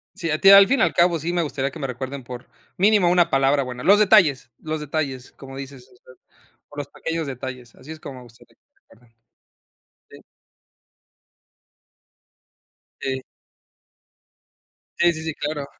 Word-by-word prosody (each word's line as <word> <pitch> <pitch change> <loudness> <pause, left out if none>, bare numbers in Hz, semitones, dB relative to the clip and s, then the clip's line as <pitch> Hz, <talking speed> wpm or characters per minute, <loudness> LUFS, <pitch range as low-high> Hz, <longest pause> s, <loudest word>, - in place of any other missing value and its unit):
Sí, 180 -5 -4
a 155 - -1
ti 195 - +6
al 195 0 +9
fin 275 - +1
y - - +4
al - - +1
cabo, 175 -1 +2
sí 170 +3 -3
me 175 - +1
gustaría 140 -2 -3
que 165 - -11
me 135 - -3
recuerden 130 +2 -6
por, 125 0 -10 0.3
mínimo 200 -2 +3
una 175 -1 +3
palabra 135 0 +2
buena. 125 -1 -7
Los 205 +2 +5
detalles, 185 - +3
los 155 0 -4
detalles, 145 -4 -4
como 135 -1 -12
dices, 135 -2 -10
o - - -22
sea, 130 +1 -19 0.5
por 145 - -9
los 145 - -5
pequeños 165 +1 -5
detalles, 125 -2 -8
así 135 +5 -13
es 160 - -9
como 135 -3 -9
me 125 - -12
gustaría 115 -1 -19
que - - -69
me - - -43
recuerden. 115 0 -24 1.0
Sí. - - -14 2.8
Sí. 130 -1 -3 1.8
Sí, 175 0 +3
sí, 160 0 -7
sí, 160 -1 -4
claro. 145 -1 -4
145 Hz, 170 wpm, -22 LUFS, 130-170 Hz, 2.8 s, al